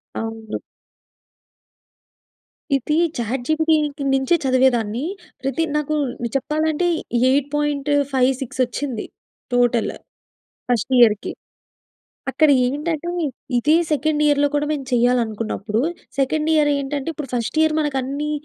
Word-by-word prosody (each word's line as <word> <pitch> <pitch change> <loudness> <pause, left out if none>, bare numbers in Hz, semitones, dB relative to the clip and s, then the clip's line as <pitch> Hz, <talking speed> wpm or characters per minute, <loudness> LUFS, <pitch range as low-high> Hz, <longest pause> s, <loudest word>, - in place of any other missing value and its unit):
అవును. 225 -1 -4 2.2
ఇది 275 +3 0 0.2
చాట్‌జి‌పిటి‌కి 295 +5 0
నుంచే 270 +6 +3
చదివేదాన్ని, 255 -2 +2 0.4
ప్రతి 270 +4 -1
నాకు 300 0 0 0.4
చెప్పాలంటే 310 +4 0 0.4
8.56 280 -2 0
వచ్చింది. 250 -1 -3 0.5
టోటల్ 245 -1 +2 0.8
ఫస్ట్ 245 +2 0
ఇయర్‌‌కి. 215 -3 +4 1.0
అక్కడ 300 +3 +4 0.2
ఏంటంటే 305 +5 -2 0.5
ఇదే 300 +6 +4 0.2
సెకండ్ 300 +1 +1
ఇయర్‍‌లో 290 0 +3
కూడా 290 0 +1
మేము 280 -3 -3
చేయాలనుకున్నప్పుడు, 230 -3 0 0.4
సెకండ్ 305 +4 +1
ఇయర్‍ 300 -1 +4
ఏంటంటే 280 +1 -3
ఇప్పుడు 285 -4 -7
ఫస్ట్ 240 +4 -2
ఇయర్‌ 315 -1 +2
మనకు 295 -2 -1
అన్నీ 285 +3 -3
275 Hz, 95 wpm, -21 LUFS, 245-300 Hz, 2.2 s, ఇయర్‌‌కి